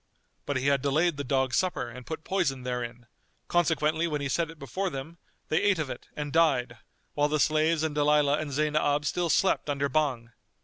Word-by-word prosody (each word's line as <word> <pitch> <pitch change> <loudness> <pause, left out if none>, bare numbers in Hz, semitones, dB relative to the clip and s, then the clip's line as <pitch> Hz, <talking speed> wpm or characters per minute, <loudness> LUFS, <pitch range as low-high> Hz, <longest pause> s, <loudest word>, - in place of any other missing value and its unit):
But 140 - 0
he 130 - -3
had 140 -1 +3
delayed 150 +3 +1
the 145 - -3
dogs' 130 -1 +1
supper 185 -9 0
and 125 +1 -10
put 160 0 -5
poison 155 -10 -1
therein; 120 -1 -4 0.4
consequently 160 -1 +1
when 150 -2 -2
he 140 -1 -3
set 165 +3 0
it 165 - -11
before 165 +8 -3
them, 150 +4 -7 0.3
they 160 +4 +2
ate 205 -2 +3
of 150 -5 -3
it - - -9
and 145 -1 -4
died 130 -8 +2 0.3
while 145 0 +2
the 155 0 0
slaves 155 +1 +2
and 160 -2 -1
Dalilah 150 0 +3
and 155 -2 -4
Zaynab 150 0 +1
still 175 +2 0
slept 190 -2 +2
under 140 0 0
Bhang. 130 -5 0
150 Hz, 195 wpm, -28 LUFS, 135-160 Hz, 0.4 s, had